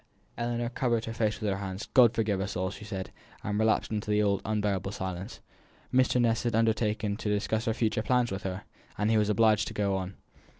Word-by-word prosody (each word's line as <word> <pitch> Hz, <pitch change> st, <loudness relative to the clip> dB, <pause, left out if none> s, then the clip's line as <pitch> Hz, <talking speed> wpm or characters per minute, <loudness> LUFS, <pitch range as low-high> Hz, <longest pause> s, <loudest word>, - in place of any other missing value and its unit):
Ellinor 120 Hz, 0 st, -2 dB
covered 120 Hz, -2 st, 0 dB
her 115 Hz, -, -5 dB
face 110 Hz, -2 st, 0 dB
with 110 Hz, -, -2 dB
her 95 Hz, -, -1 dB
hands. 95 Hz, 0 st, -5 dB
"God 120 Hz, -3 st, +6 dB
forgive 105 Hz, -4 st, 0 dB
us 95 Hz, +1 st, -3 dB
all," 95 Hz, +1 st, -1 dB
she 105 Hz, -, -9 dB
said, 95 Hz, -2 st, -5 dB, 0.3 s
and 105 Hz, +1 st, -1 dB
relapsed 110 Hz, 0 st, +2 dB
into 105 Hz, 0 st, -3 dB
the 105 Hz, 0 st, +3 dB
old 100 Hz, -1 st, +1 dB
unbearable 100 Hz, -2 st, -1 dB
silence. 95 Hz, -1 st, -5 dB, 0.5 s
Mr. 130 Hz, -1 st, +3 dB
Ness 115 Hz, -2 st, +2 dB
had 120 Hz, -2 st, -1 dB
undertaken 110 Hz, -2 st, +1 dB
to 110 Hz, -, -3 dB
discuss 110 Hz, +2 st, 0 dB
her 115 Hz, -, +1 dB
future 110 Hz, -2 st, 0 dB
plans 125 Hz, +1 st, +1 dB
with 95 Hz, 0 st, -3 dB
her, 95 Hz, -2 st, -4 dB, 0.3 s
and 105 Hz, +2 st, +1 dB
he 110 Hz, -, +4 dB
was 105 Hz, 0 st, +1 dB
obliged 110 Hz, 0 st, +3 dB
to -, -, -7 dB
go 100 Hz, -2 st, +1 dB
on. 95 Hz, 0 st, -4 dB
105 Hz, 215 wpm, -29 LUFS, 100-115 Hz, 0.5 s, God